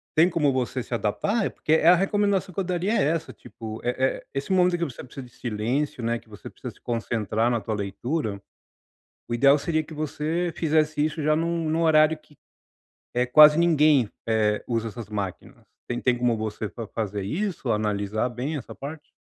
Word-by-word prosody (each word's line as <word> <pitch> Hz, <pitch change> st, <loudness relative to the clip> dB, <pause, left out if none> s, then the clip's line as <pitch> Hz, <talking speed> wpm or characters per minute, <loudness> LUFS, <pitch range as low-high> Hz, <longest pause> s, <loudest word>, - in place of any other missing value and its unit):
tem 165 Hz, +3 st, +5 dB
como 155 Hz, -5 st, +2 dB
você 130 Hz, -1 st, -2 dB
se 120 Hz, -, -8 dB
adaptar? 200 Hz, -, 0 dB
É, -, -, 0 dB
porque -, -, -4 dB
é 160 Hz, +1 st, +4 dB
a 180 Hz, -, +9 dB
recomendação 195 Hz, 0 st, +1 dB
que -, -, -4 dB
eu -, -, +1 dB
daria 185 Hz, +4 st, -1 dB
é -, -, +3 dB
essa, 160 Hz, 0 st, -5 dB
tipo, 110 Hz, -1 st, -9 dB
eh 125 Hz, 0 st, -1 dB
eh 130 Hz, 0 st, 0 dB
esse 135 Hz, +6 st, -3 dB
momento 180 Hz, -1 st, +3 dB
que -, -, 0 dB
você 140 Hz, -8 st, -5 dB
precisa 130 Hz, +1 st, -9 dB
de 120 Hz, -, -22 dB
silêncio, 120 Hz, +5 st, -2 dB
né, 115 Hz, +1 st, 0 dB
que -, -, -25 dB
você 105 Hz, -, -10 dB
precisa -, -, -9 dB
se -, -, -25 dB
concentrar 115 Hz, -1 st, -1 dB
na 120 Hz, -2 st, 0 dB
tua 110 Hz, +1 st, -3 dB
leitura, 105 Hz, +2 st, -3 dB, 0.9 s
o 120 Hz, -, -2 dB
ideal 140 Hz, +4 st, +5 dB
seria 155 Hz, +1 st, 0 dB
que 160 Hz, -, -12 dB
você 155 Hz, +3 st, -2 dB
fizesse 155 Hz, -1 st, +1 dB
isso 155 Hz, 0 st, -2 dB
já 155 Hz, +1 st, +3 dB
num 165 Hz, 0 st, -1 dB
num 160 Hz, +2 st, +1 dB
horário 155 Hz, -1 st, +5 dB
que, 150 Hz, -1 st, -24 dB, 0.8 s
eh, 125 Hz, +1 st, +2 dB
quase 150 Hz, +4 st, +8 dB
ninguém, 155 Hz, -7 st, +4 dB, 0.2 s
eh, 105 Hz, -1 st, +2 dB
usa 115 Hz, -1 st, -1 dB
essas 110 Hz, 0 st, -8 dB
máquinas. 100 Hz, -4 st, -5 dB, 0.3 s
Você 120 Hz, -, -1 dB
não -, -, -3 dB
tem 125 Hz, -1 st, +2 dB
como 120 Hz, -2 st, +2 dB
você 110 Hz, -1 st, -4 dB
fa 115 Hz, -, -7 dB
fazer 105 Hz, -1 st, -3 dB
isso, 160 Hz, -, -2 dB
analisar 105 Hz, +2 st, -1 dB
bem 130 Hz, +6 st, -4 dB
essa 130 Hz, -, -7 dB
parte? 145 Hz, +3 st, -8 dB
135 Hz, 205 wpm, -25 LUFS, 115-160 Hz, 0.9 s, a